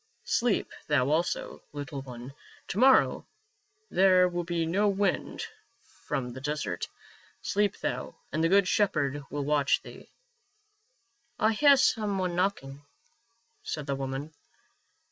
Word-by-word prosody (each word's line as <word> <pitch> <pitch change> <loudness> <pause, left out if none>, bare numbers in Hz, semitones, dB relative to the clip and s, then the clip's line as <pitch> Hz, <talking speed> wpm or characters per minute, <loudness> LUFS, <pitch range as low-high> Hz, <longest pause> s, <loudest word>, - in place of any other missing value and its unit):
Sleep 235 -3 +1 0.2
thou 140 -2 +2
also, 165 +3 -1
little 145 -1 -5
one; 125 0 -9 0.4
to 195 - -2
morrow 265 +1 +4 0.6
there 185 -1 +5
will 175 -1 -3
be 170 -1 -1
no 195 +6 +2
wind 200 -1 -1 0.6
from 125 -2 -2
the 130 - -8
desert. 145 -11 -3 0.6
Sleep 205 0 +1
thou, - - -4 0.2
and 155 +3 0
the 165 - +3
good 200 0 +4
Shepherd 145 -9 +1
will 145 -1 -3
watch 145 -1 +2
thee." - - -12 0.7
" 240 - -43
I 220 +1 +3
hear 280 +4 +6
some 215 -6 +2
one 180 -2 -1
knocking," 145 -7 -2 0.8
said 150 -2 -5
the 140 - -1
woman. 135 +3 -4
170 Hz, 130 wpm, -28 LUFS, 140-205 Hz, 0.8 s, hear